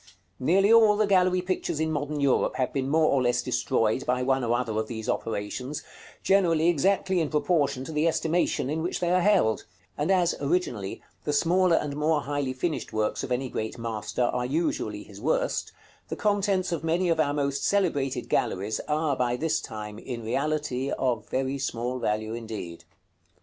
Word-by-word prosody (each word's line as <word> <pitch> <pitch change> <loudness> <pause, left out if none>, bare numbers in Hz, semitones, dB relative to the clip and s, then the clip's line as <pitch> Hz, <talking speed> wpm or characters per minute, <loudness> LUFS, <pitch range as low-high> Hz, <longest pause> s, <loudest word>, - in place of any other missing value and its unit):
Nearly 195 - +4
all 220 -2 +6
the 215 - +3
gallery 185 -2 +3
pictures 180 -4 -2
in 160 0 0
modern 150 0 -2
Europe 140 -2 +2
have 130 - -1
been 135 -1 -1
more 160 +2 +3
or 140 - +3
less 120 0 +1
destroyed 120 -1 0
by 125 0 0
one 135 0 +1
or 120 0 +1
other 115 -3 -2
of 110 - -2
these 110 -2 -6
operations, 125 +7 -3 0.4
generally 170 -4 +3
exactly 185 +3 +2
in 155 - -1
proportion 150 -4 +1
to 145 - -7
the 155 +1 +1
estimation 165 -3 +1
in 155 +3 -2
which 175 - -2
they 175 -1 0
are 180 0 +3
held; 185 - +2 0.3
and 150 +4 -1
as, 180 -3 +3
originally, 140 - -1 0.2
the 150 - -1
smaller 175 +3 +3
and 145 -3 -1
more 150 +1 +1
highly 145 -2 -2
finished 155 +5 -3
works 110 -1 -1
of - - -5
any 130 +2 0
great 110 -2 -4
master 110 0 -3
are 125 0 0
usually 150 +7 -1
his - - -13
worst, - - 0 0.4
the - - -3
contents 200 -3 +1
of 165 -3 -2
many 170 +3 +1
of 165 -2 +1
our 145 -2 +2
most 140 -1 -1
celebrated 160 -10 0
galleries 105 +4 0
are 150 -1 +1
by 125 -1 0
this 155 +5 0
time, 105 -2 -7
in 120 -2 -6
reality, 135 +2 -1
of 120 -5 -1
very 135 +1 -1
small 125 -1 -2
value 110 0 -1
indeed. 110 -7 -7
145 Hz, 180 wpm, -27 LUFS, 125-170 Hz, 0.4 s, all